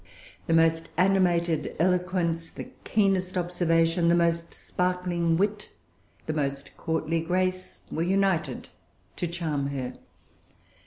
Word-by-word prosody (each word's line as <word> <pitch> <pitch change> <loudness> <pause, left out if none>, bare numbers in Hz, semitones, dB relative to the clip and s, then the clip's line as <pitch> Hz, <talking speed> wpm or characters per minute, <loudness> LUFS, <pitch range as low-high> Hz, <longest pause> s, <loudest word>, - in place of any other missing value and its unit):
The 165 - +3
most 165 0 +3
animated 175 -4 +2
eloquence, 175 -1 +1
the - - -9
keenest 190 -3 +1
observation, 170 -1 +2
the 170 - +5
most 170 -1 +1
sparkling 180 -2 -1
wit, 210 +2 -1 0.6
the 155 - -2
most 140 -2 -3
courtly 160 0 -1
grace, 185 +2 -2
were 160 - -2
united 190 -1 0 0.5
to 175 - -1
charm 160 -5 -2
her. 135 -3 -4
170 Hz, 110 wpm, -27 LUFS, 165-185 Hz, 0.6 s, the